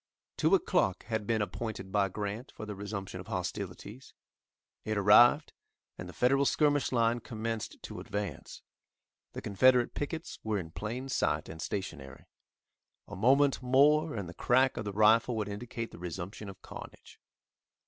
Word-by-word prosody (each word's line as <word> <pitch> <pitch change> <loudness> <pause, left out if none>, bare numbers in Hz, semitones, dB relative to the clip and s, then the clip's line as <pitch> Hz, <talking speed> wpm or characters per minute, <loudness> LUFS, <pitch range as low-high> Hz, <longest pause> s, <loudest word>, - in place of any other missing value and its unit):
Two - - +4
o'clock 95 -2 +1
had 110 -3 -3
been 110 -2 +1
appointed 100 -1 -5
by 100 -1 +2
Grant 105 +6 -5
for 110 - -7
the 105 - -5
resumption 100 -2 -6
of 90 - -9
hostilities. 100 +6 -6 0.7
It 110 -1 -2
arrived, 120 +9 +6 0.4
and 90 - -8
the - - -10
Federal 135 - +3
skirmish 145 0 +2
line 115 -1 +2
commenced 115 -1 -5
to - - -7
advance. 100 -2 -5 0.7
The - - -7
Confederate 125 +4 +3
pickets 160 +3 -5
were 110 -1 -1
in 85 -4 -6
plain 115 +9 -5
sight, 135 - 0
and 80 - -8
stationary. 80 -9 -6 0.8
A - - -8
moment 135 +7 +3
more 145 +4 +4
and 100 -5 -4
the 85 - -8
crack 130 +7 +2
of - - -4
the 100 - -3
rifle 110 +3 +4
would 105 -2 -2
indicate 115 +2 -5
the - - -12
resumption 90 +4 -6
of 95 - -12
carnage. - - -11
110 Hz, 155 wpm, -31 LUFS, 100-125 Hz, 0.8 s, arrived